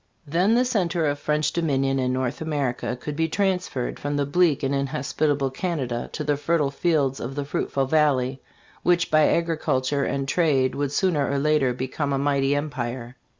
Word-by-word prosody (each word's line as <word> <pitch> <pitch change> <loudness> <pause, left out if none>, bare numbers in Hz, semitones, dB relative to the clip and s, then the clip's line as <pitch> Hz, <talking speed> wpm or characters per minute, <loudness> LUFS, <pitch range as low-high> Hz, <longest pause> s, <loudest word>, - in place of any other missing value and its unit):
Then 180 +9 +2
the 250 +1 +3
center 180 -9 0
of 145 -1 0
French 150 0 0
dominion 135 -5 +1
in 125 -1 0
North 130 +2 -2
America 140 -5 -2
could 150 +3 -5
be 160 +1 +1
transferred 180 -9 -1
from 145 0 -2 0.2
bleak 170 -4 +3
and 135 +1 0
inhospita 140 +1 0
ble 135 -2 -1
Canada 135 -6 -3
to 155 - -3
the 145 -1 0
fertile 150 -1 +1
fields 140 -4 +1
of 130 +3 -5
the 145 -1 -3
fruitful 140 -1 -1
valley, 135 -3 +1 0.4
which 175 -1 +2
by 155 -1 +5
agriculture 145 -5 0
and 135 0 -2
trade 140 -5 +2
would 145 -1 -2
sooner 155 -4 +1
or 140 - 0
later 145 -2 +2
become 130 +3 -3
a - - +1
mighty 140 0 +1
empire. 125 -4 -4
145 Hz, 175 wpm, -24 LUFS, 135-160 Hz, 0.4 s, by